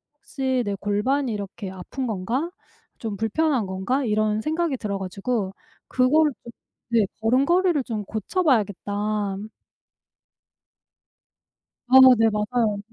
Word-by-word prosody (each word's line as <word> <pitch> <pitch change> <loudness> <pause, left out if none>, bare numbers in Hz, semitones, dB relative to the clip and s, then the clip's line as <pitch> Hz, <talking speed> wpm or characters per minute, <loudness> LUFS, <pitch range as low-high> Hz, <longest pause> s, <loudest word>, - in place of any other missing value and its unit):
혹시 260 -3 -2
내 200 - -2
골반이 220 +7 0
이렇게 200 -1 -6
아픈 190 +8 -6
건가? 230 - -2 0.5
좀 220 -3 -4
불편한 250 +1 +1
건가?' 190 +9 -1
이런 215 -1 +1
생각이 315 0 -1
들어 205 -4 -3
가지고 195 +2 -3 0.3
그걸 295 +4 +3
좀 235 - -10 0.4
네 225 -3 +4 0.2
'걸음걸이를 290 +7 +3
좀 215 -3 -3
고쳐 220 - -2
봐야겠다.' 205 - 0 2.5
아. 260 +1 +8 0.2
네. 225 - +5
맞아요. 210 0 0
225 Hz, 230 characters per minute, -24 LUFS, 205-265 Hz, 2.5 s, 아